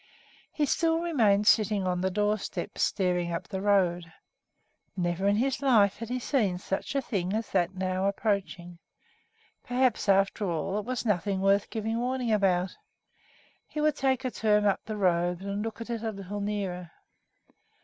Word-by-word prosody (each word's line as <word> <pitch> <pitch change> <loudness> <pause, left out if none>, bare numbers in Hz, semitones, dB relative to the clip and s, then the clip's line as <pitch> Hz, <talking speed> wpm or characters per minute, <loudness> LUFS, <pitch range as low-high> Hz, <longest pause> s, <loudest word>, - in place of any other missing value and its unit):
He 300 - 0
still 325 +3 +1
remained 225 -12 +2
sitting 210 -3 +3
on 180 -1 0
the 190 - +1
doorstep, 210 +2 -2
staring 180 -3 +1
up 170 - -4
the 190 -2 -4
road. 180 -4 +1 0.9
Never 175 +2 0
in 200 - +3
his 260 +5 0
life 220 -8 +4
had 230 0 -7
he 250 - -1
seen 225 -8 0
such 195 +8 -4
a 275 - +1
thing 190 -6 -2
as 220 0 -3
that 185 0 +1
now 185 +1 -1
approaching. 195 -4 -2 0.8
Perhaps, 250 -4 +1
after 195 0 +2
all, 175 +5 -1
it 210 - -6
was 255 0 -3
nothing 200 -2 0
worth 195 +1 +2
giving 225 0 -2
warning 250 -1 -1
about. 190 -3 +1 0.9
He 305 - -6
would 300 -1 +2
take 265 -2 0
a 255 - -1
turn 210 -2 +2
up 200 - +2
the 215 0 -5
road 175 -2 +1
and 200 +1 -3
look 225 0 -5
at 230 - -7
it 230 -2 -3
a 225 - -2
little 200 0 -6
nearer. 195 -4 -3
205 Hz, 170 wpm, -28 LUFS, 185-230 Hz, 0.9 s, life